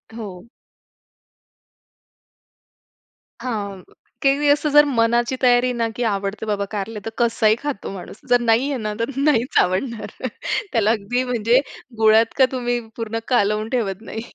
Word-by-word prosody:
हो. 200 -4 -8 2.9
हां, 205 -6 -4 0.4
की 275 - +4
मी 295 - 0
असं 295 +1 +3
जर 295 0 +8
मनाची 235 +2 +2
तयारी 250 0 +4
ना 230 - +2
की 245 - -2
आवडते 200 +2 -3
बाबा 205 -1 -1
कारलं, 210 +1 -4
तर - - -2
कसाही 225 -2 +3
खातो 290 -8 -4
माणूस. 195 +2 -9
जर 245 - +5
नाहीये 245 +4 +2
ना 215 -2 -3
तर 230 - -1
नाहीच 275 -4 +1
आवडणार. 220 +5 -3 0.6
त्याला 220 -3 +2
अगदी 235 +4 -1
म्हणजे 240 0 +2 0.4
गुळात 220 +1 +4
का 260 - +6
तुम्ही 245 -1 -1 0.2
पूर्ण 225 -1 -3
कालवून 215 -2 +1
ठेवत 200 -4 -2
नाही. 225 0 -6
230 Hz, 140 wpm, -21 LUFS, 210-245 Hz, 2.9 s, जर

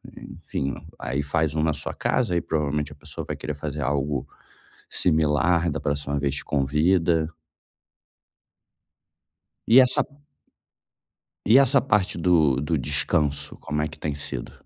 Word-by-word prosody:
enfim, 70 0 -5 0.2
aí 70 +3 -2
faz 80 +1 0
um 80 - +1
na 80 -1 +2
sua 70 - -4
casa 115 -8 0
e 85 - +1
provavelmente 75 -2 -1
a - - -11
pessoa - - -8
vai - - -4
querer 75 - -5
fazer 75 0 -5
algo 70 -1 -1 0.6
similar, 80 +1 +2
da 80 - -3
próxima 70 0 -2
vez 70 0 -1
te 70 - -4
convida. 80 +3 +1 2.3
E 115 +4 +8
essa 130 -1 +4 1.4
e 115 +5 +6
essa 135 0 +5
parte 105 -7 +1
do 80 -6 +3
do 75 +2 0
descanso, 70 +1 -1
como 75 0 -3
é 75 - 0
que 75 +1 -13
tem 75 -1 -2
sido? 70 -4 -5
75 Hz, 140 wpm, -24 LUFS, 70-85 Hz, 2.3 s, E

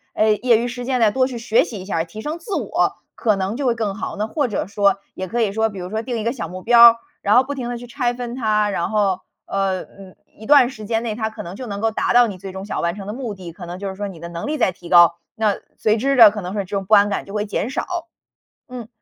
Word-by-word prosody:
哎， 215 0 +3
业 240 -2 +4
余 235 +2 -1
时 245 0 -6
间 255 0 0
呢， 220 -3 +4
多 255 +3 +2
去 255 -2 -6
学 230 -1 +2
习 215 - -7
一 185 - -8
下 195 - -2
儿 165 - 0
提 215 +6 -9
升 305 +7 -4
自 405 +1 -5
我， - - 0 0.2
可 215 -3 +1
能 195 +2 -2
就 270 +1 -1
会 235 - +2
更 215 -3 -2
好。 215 - -5
那 210 - -1
或 280 +5 -1
者 210 - -2
说 200 0 +2 0.2
也 185 - -5
可 235 +6 -1
以 215 -3 +1
说 220 +2 +1
比 200 - -10
如 180 0 -6
说 220 +1 -1
定 240 0 -4
一 220 - -3
个 230 +2 0
小 200 -11 -5
目 185 +2 -9
标 235 0 +8
儿， 230 - +6 0.3
然 205 - +3
后 250 - +6
不 280 +2 -5
停 250 -4 -5
地 245 - -3
去 240 - -9
拆 245 -1 -2
分 240 -1 -5
它， 215 -4 +1
然 170 -3 -1
后， 200 -4 +1 0.2
呃， 195 -1 -1
嗯， 195 -2 -15 0.2
一 220 - -10
段 275 -4 +6
时 215 -4 -10
间 225 +2 -1
内， 230 -2 -2
它 220 0 -2
可 - - -8
能 175 +2 -8
就 255 +3 -7
能 200 -2 -5
够 225 +1 +1
达 220 - 0
到 245 0 +7
你 200 -5 -6
最 195 +1 -7
终 190 +1 -7
想 - - -3
完 170 +1 -1
成 200 -1 -8
的 205 - -5
目 240 -4 -5
的， 180 -3 -9
可 175 +1 -10
能 175 +1 -6
就 195 +1 -4
是 190 - -7
说 205 +1 -4
你 185 -4 -10
的 170 - -7
能 170 +5 -6
力 305 +1 -1
在 225 -8 +2
提 175 -1 -13
高， 170 -1 +6 0.2
那 215 -2 +1 0.2
随 215 0 +2
之 275 +5 +1
的 225 -5 +9
可 210 0 -5
能 180 +1 -5
是 - - -1
这 195 +1 -6
种 195 - -1
不 215 - +6
安 205 0 +5
感 200 - -3
就 200 - -8
会 210 0 -1
减 210 +2 -2
少。 340 +5 -4 0.6
嗯， 245 -3 -7
215 Hz, 330 characters per minute, -21 LUFS, 195-240 Hz, 0.6 s, 的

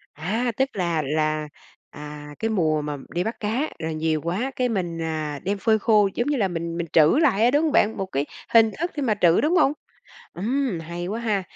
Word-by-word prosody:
A, 220 +11 -1
tức 265 0 +2
là 170 -4 0
là, 155 +1 -1 0.4
à, 150 0 -9
cái 225 - -1
mùa 160 -8 +1
mà 150 -1 -4
đi 175 - -1
bắt 225 +4 -4
cá, 230 +9 -1
rồi 160 -1 -3
nhiều 155 0 0
quá 190 - -2
cái 250 -1 0
mình, 175 -6 -2
à, 155 -3 -3
đem 200 +2 -1
phơi 220 +2 +2
khô 210 -2 +4
giống 240 - -1
như 290 -1 +1
là 205 -5 +2
mình 170 -1 -4
mình 170 -1 -3
trữ 155 - +5
lại 225 -9 +3
á, 245 - +4
đúng 290 +3 +3
hông 315 - +1
bạn? 225 -8 +2
Một 195 - -2
cái 140 +1 0 0.3
hình 225 -1 +6
thức 340 +2 -1
khi 295 - -4
mà 240 -6 +2
trữ, 170 -1 +5
đúng 315 +5 +2
không? 280 - +4 0.6
Ừm, 230 0 -1
hay 170 +2 -6
quá 215 +5 -3
ha! 215 -4 0
190 Hz, 230 wpm, -24 LUFS, 160-235 Hz, 0.6 s, hình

